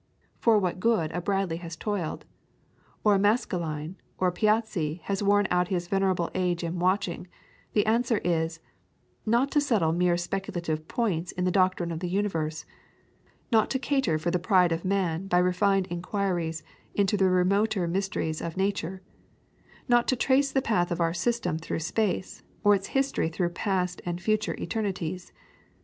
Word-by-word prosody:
for 230 -2 +4
what 185 -3 -1
good 185 -7 +2
a 175 - -3
Bradley 195 -3 0
has 170 -1 -7
toiled, 195 -3 -3 0.8
or 210 - +5
a 195 - +3
Maskelyne 175 -6 0 0.2
or 185 - +2
a - - -3
Piazzi 210 -6 0
has 200 0 -2
worn 205 0 +3
out 180 0 +2
his 175 -2 -2
venerable 190 -3 +1
age 180 -2 0
in 170 +1 -3
watching, 180 -1 0 0.5
the 210 - +3
answer 230 +1 +2
is 165 -1 0 0.7
not 240 +5 +2
to 295 - +3
settle 215 - +2
mere 175 +1 +2
speculative 175 -3 -3
points 185 -8 -1
in 180 - -2
the 180 - +2
doctrine 185 -2 +2
of 160 - -3
the 180 0 -3
universe; 165 -5 -1 0.9
not 220 -2 +4
to 265 - 0
cater 265 - +1
for 165 +3 -1
the 180 - +1
pride 180 -2 +3
of 165 0 -1
man 185 -2 0
by 180 - +2
refined 180 +2 +2
inquiries 175 -3 -2 0.3
into 200 0 +2
the 190 -2 +3
remoter 190 +1 +2
mysteries 170 -3 -2
of 165 +1 -5
nature; 190 -1 -2 0.8
not 240 -1 +4
to 255 - +3
trace 270 +3 +2
the 265 -1 +1
path 175 -6 +1
of 175 - -2
our 165 -1 +1
system 185 -2 -1
through 165 - -3
space, 185 +4 -2 0.2
or 205 -1 +6
its 195 -1 0
history 270 -11 +1
through 175 +1 -1
past 180 0 -1
and 175 0 -3
future 215 +4 0
eternities. 185 -5 -3
185 Hz, 165 wpm, -27 LUFS, 170-205 Hz, 0.9 s, or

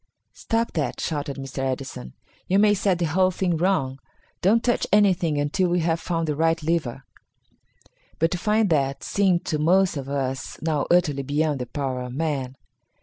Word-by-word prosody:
"Stop 230 0 -1
that!" 150 -4 -2
shouted 145 -3 -3
Mr. 135 0 -6
Edison, 130 - -4 0.3
"you 190 - +2
may 205 0 +5
set 195 -2 +1
the 170 - 0
whole 185 +4 +2
thing 180 -1 -1
wrong. 155 -7 0 0.4
Don't 225 +6 +3
touch 240 - +1
anything 185 -7 +3
until 150 +5 +1
we 175 0 +1
have 165 0 0
found 165 -2 -2
the 150 - -1
right 165 +1 +1
lever." 150 -6 -1 1.1
But 165 +1 +1
to 180 - -2
find 210 0 +2
that 140 -3 0
seemed 190 -4 +1
to 155 - -1
most 180 +2 +3
of 135 -1 -6
us 135 -2 -3
now 155 -3 0
utterly 160 -6 +3
beyond 145 +1 0
the 125 - -4
power 130 -1 -3
of 125 0 -6
man. 140 -4 -2
160 Hz, 175 wpm, -24 LUFS, 140-180 Hz, 1.1 s, may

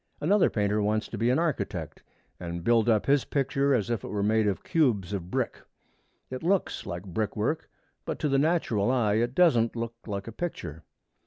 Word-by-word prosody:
Another 195 +6 +3
painter 105 0 0
wants 105 +1 0
to 115 - -5
be 115 +2 +2
an 130 - +3
architect 165 -4 -2 0.4
and 85 -1 -5
build 115 +2 +3
up 110 -2 +3
his 140 -1 +3
picture 140 0 0
as 110 -2 -1
if 115 -4 -1
it - - -5
were 100 -1 -2
made 110 +1 +2
of 100 - -1
cubes 110 - +1
of 90 -3 -4
brick. - - -2 0.7
It 130 - -4
looks 190 +3 0
like 85 +1 -5
brick 100 +4 -3
work, 150 +10 -1 0.3
but - - -4
to 150 - -1
the 135 -1 +2
natural 140 -10 +1
eye 110 -5 +2
it 120 +3 0
doesn't 120 -11 +4
look 115 0 -3
like 100 -2 -4
a - - -5
picture. 85 - -5
115 Hz, 195 wpm, -28 LUFS, 105-140 Hz, 0.7 s, doesn't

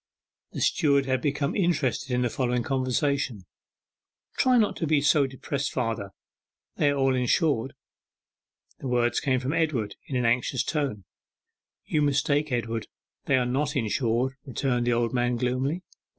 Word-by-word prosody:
The - - -4
steward 140 -5 +3
had 130 -1 0
become 140 0 -1
interested 160 -8 0
in 125 0 +1
the 120 - +1
following 125 -2 0
conversation: 130 -4 -1 0.9
'Try 255 -1 +4
not 215 -3 +2
to 165 - -1
be 150 -1 +3
so 145 0 +3
depressed, 135 +1 -3
father; 115 -5 -2 0.7
they 145 - +3
are 145 - +1
all 135 -1 +2
insured.' 130 0 +1 1.0
The - - -5
words 120 -1 +1
came 130 -2 +1
from 130 +3 -2
Edward 140 -11 -1
in 135 - -4
an 125 -1 +1
anxious 125 +2 +1
tone. 140 - -2 0.8
'You 150 - 0
mistake, 145 +1 +1
Edward; 115 -2 -2 0.4
they 135 - +3
are 125 - +1
not 140 +4 -1
insured,' 120 +1 0
returned 125 -2 -1
the 120 - +3
old 120 +1 0
man 120 0 +1
gloomily. 130 +8 -1
130 Hz, 150 wpm, -26 LUFS, 120-145 Hz, 1.0 s, Try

